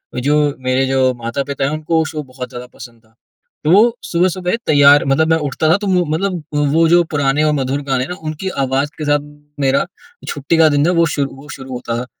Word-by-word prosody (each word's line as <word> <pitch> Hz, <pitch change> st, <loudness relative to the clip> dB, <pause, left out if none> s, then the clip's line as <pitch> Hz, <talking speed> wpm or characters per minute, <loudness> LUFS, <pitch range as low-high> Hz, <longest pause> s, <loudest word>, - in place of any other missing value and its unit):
जो 145 Hz, +3 st, +1 dB
मेरे 130 Hz, +1 st, 0 dB
जो 130 Hz, -1 st, +2 dB
माता-पिता 140 Hz, +4 st, -3 dB
हैं 140 Hz, -, -1 dB
उनको 155 Hz, +2 st, -2 dB
वो 160 Hz, -, +2 dB
शो 155 Hz, -1 st, -5 dB
बहुत 130 Hz, -1 st, -8 dB
ज़्यादा 125 Hz, 0 st, -9 dB
पसंद 115 Hz, -2 st, -13 dB
था। 110 Hz, 0 st, -31 dB, 0.5 s
तो 155 Hz, -, +2 dB
वो 225 Hz, +5 st, +5 dB
सुबह-सुबह 180 Hz, +2 st, 0 dB
तैयार 145 Hz, -1 st, +6 dB
मतलब 140 Hz, +4 st, +2 dB
मैं 160 Hz, 0 st, +3 dB
उठता 155 Hz, +3 st, -1 dB
था 170 Hz, -, +4 dB
तो 205 Hz, 0 st, -5 dB
वो 180 Hz, -2 st, +2 dB
मतलब 180 Hz, -1 st, -2 dB, 0.3 s
वो 165 Hz, 0 st, +4 dB
जो 175 Hz, +1 st, +5 dB
पुराने 145 Hz, 0 st, +1 dB
और 155 Hz, -1 st, +2 dB
मधुर 135 Hz, 0 st, -1 dB
गाने 135 Hz, -3 st, -1 dB
हैं 130 Hz, -, -7 dB
ना, 180 Hz, -, -4 dB
उनकी 155 Hz, +5 st, -4 dB
आवाज़ 135 Hz, +2 st, 0 dB
के 155 Hz, -, -4 dB
साथ 145 Hz, 0 st, +2 dB, 0.4 s
मेरा 135 Hz, 0 st, +2 dB, 0.4 s
छुट्टी 145 Hz, +3 st, -1 dB
का 160 Hz, -1 st, +6 dB
दिन 145 Hz, 0 st, +2 dB
था -, -, +3 dB
वो 170 Hz, -, +5 dB
शुरू 140 Hz, 0 st, -4 dB
शुरू 135 Hz, -1 st, -11 dB
होता 120 Hz, -1 st, -4 dB
था। 125 Hz, -, -4 dB
145 Hz, 220 wpm, -17 LUFS, 135-160 Hz, 0.5 s, तैयार